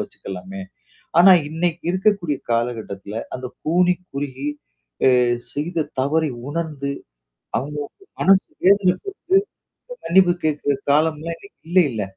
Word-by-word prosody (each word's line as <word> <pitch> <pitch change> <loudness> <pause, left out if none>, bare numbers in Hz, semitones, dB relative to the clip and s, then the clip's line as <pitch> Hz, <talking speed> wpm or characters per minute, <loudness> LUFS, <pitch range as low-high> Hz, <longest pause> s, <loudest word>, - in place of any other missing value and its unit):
வச்சுக்கலாமே! 95 - -7 0.6
ஆனா 185 +2 +9 0.2
இன்னைக்கு 165 +1 -2
இருக்கக்கூடிய 185 -5 +1
காலகட்டத்தில, 115 -3 -2
அந்த 130 0 -5 0.2
கூனி 180 +3 +3 0.2
குறுகி, 140 0 -4 0.7
அ - - +4 0.3
செய்த 160 +2 -2
தவறை 155 +2 +1 0.2
உணர்ந்து, 150 -3 -3 0.7
அவங்களுக்கு 145 - -6 0.2
மனசு 195 0 +5 0.2
வேதனப்பட்டு, 200 - +3 0.9
மன்னிப்பு 175 0 +5
கேட்கிற 145 -2 0 0.2
காலம்லாம் 160 +2 +1
இன்னைக்கு 200 - -17
இல்லைல? 150 - +3
155 Hz, 100 wpm, -21 LUFS, 135-180 Hz, 0.9 s, ஆனா